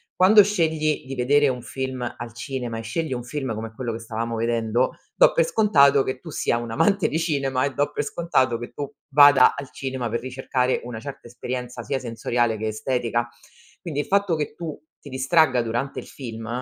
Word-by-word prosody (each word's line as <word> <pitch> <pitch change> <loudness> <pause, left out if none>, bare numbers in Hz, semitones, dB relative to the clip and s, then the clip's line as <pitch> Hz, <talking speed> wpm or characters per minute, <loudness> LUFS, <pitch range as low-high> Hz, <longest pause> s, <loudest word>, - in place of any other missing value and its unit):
quando 200 +3 +7
scegli 160 -7 0
di 135 - -5
vedere 145 +4 +3
un 125 -1 -3
film 130 0 -4 0.2
al 115 -1 -7
cinema, 120 -2 -4
e - - -4
scegli 155 +6 -2
un 120 -1 -4
film 130 -1 -4
come 110 +1 -6
quello 120 -1 -3
che 115 - -5
stavamo 115 0 -4
vedendo, 115 +1 +1 0.2
do - - +6
per 165 - +3
scontato 140 -9 +4
che 130 -1 -4
tu 165 - -10
sia 115 - 0
un 120 0 -5
amante 200 - +2
di 155 - -1
cinema, 140 -5 0
e 140 - -2
do 145 +2 0
per - - -2
scontato 130 -7 0
che 120 - -7
tu 145 -1 -5 0.2
vada 145 -2 +7
al 140 -2 -7
cinema 130 -3 -4
per 115 - -1
ricercare 130 0 -1
una 120 -2 -6
certa 140 +1 -9
esperienza 125 0 -5
sia 135 +5 -2
sensoriale 120 -1 -1
che 110 +1 -3
estetica. 120 +1 -1 0.5
Quindi, 155 -6 -2
il - - -7
fatto 200 -3 +2
che 150 -1 -3
tu 165 -3 -6 0.2
ti 145 - -12
distragga 130 0 +3
durante 120 +4 -3
il - - -9
film, 115 -4 -8
130 Hz, 200 wpm, -23 LUFS, 120-145 Hz, 0.5 s, quando